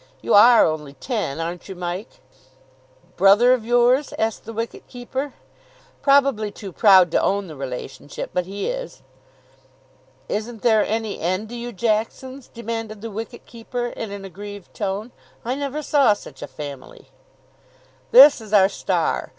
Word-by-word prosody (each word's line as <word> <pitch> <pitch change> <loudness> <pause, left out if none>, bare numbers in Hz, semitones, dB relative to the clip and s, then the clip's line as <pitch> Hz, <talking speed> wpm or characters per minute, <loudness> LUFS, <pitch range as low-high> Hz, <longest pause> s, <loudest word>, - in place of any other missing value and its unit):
You - - -1
are 230 +3 +8
only 150 -3 -3
ten, 165 - -3
aren't 170 +3 -5
you, 190 - -6
Mike?" 180 - -6 1.0
"Brother 210 +6 +6
of 250 -3 -1
yours?" 245 +4 +2
asked 220 0 -2
the 225 - -7
wicket 230 +1 -6
keeper. 260 +3 -5 0.7
"Probably 275 -6 +3
too 200 -1 -9
proud 185 -3 +6
to - - +2
own 200 0 0
the 160 -4 -10
relationship, 135 +1 -7
but 180 -1 -1
he 200 +1 -5
is." - - -6 1.2
"Isn't 220 +1 -4
there 220 -3 +4
any 220 -1 -3
end 185 +6 -2
to 240 - -7
you 240 0 -6
Jacksons?" 235 +5 -2
demanded 225 -2 -6
the 230 0 -6
wicket 225 +3 -7
keeper 240 +1 -5
in 225 -3 -6
an 200 -1 -7
aggrieved 205 +1 -10
tone. 205 +3 -4 0.3
"I 245 - -1
never 285 +2 -4
saw 275 -7 +4
such 140 -9 -12
a 145 - -5
family." 145 -3 -10 1.0
"This 300 - +8
is 215 -1 -10
our 195 -2 +6
star. - - -1
215 Hz, 150 wpm, -22 LUFS, 190-240 Hz, 1.2 s, are